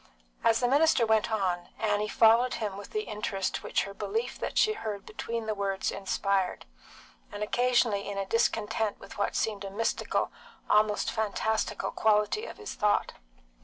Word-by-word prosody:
As 225 0 +4
the 245 - +2
minister 285 -2 +4
went 220 +1 +2
on, 180 -5 -1
Annie 210 -1 0
followed 230 +3 +4
him 210 -3 -3
with 200 - -9
the 430 0 -2
interest 205 - -3
which - - 0
her 200 - -7
belief 220 +5 -3
that - - -4
she 430 - +4
heard 210 - -5
between 230 +1 -4
the 215 - -1
words 195 -1 -1
inspired, 195 -1 -1 0.7
and 205 - -4
occasionally 235 -3 +2
in 200 - -4
a 195 - -1
discontent 220 0 0
with 195 - -11
what 200 - 0
seemed 210 -2 -1
a 195 - -5
mystical, 225 +4 -1 0.4
almost 210 0 +3
a - - -9
fantastical, 220 0 -1
quality 215 - +2
of - - -9
his 425 - -6
thought. 210 -3 +1
215 Hz, 165 wpm, -29 LUFS, 200-230 Hz, 0.7 s, As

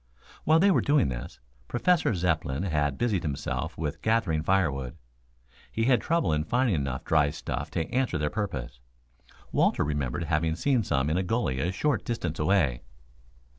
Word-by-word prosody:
While 160 +1 +5
they 195 +4 +5
were - - +3
doing 145 - +3
this, - - -6 0.3
Professor 160 - +2
Zepplin 80 -4 0
had 75 -6 0
busied 110 -7 0
himself 70 -3 -3
with 75 -2 -4
gathering 110 -9 +1
firewood. 75 -8 0 0.7
He 115 - 0
had 125 -3 +4
trouble 165 - +1
in 75 0 +1
finding 120 +5 +1
enough 70 -4 -2
dry 75 -2 +3
stuff - - -4
to 80 - -2
answer 130 -8 +1
their 75 -1 -1
purpose. 70 - -4 0.7
Walter - - +2
remembered 75 +1 -2
having 80 0 0
seen 130 +5 +2
some 70 -6 0
in 80 - +1
a 95 - +1
gully 90 - -1
a 85 +6 0
short 115 +1 0
distance 90 -9 -3
away. 75 -8 +2
85 Hz, 165 wpm, -27 LUFS, 75-115 Hz, 0.7 s, While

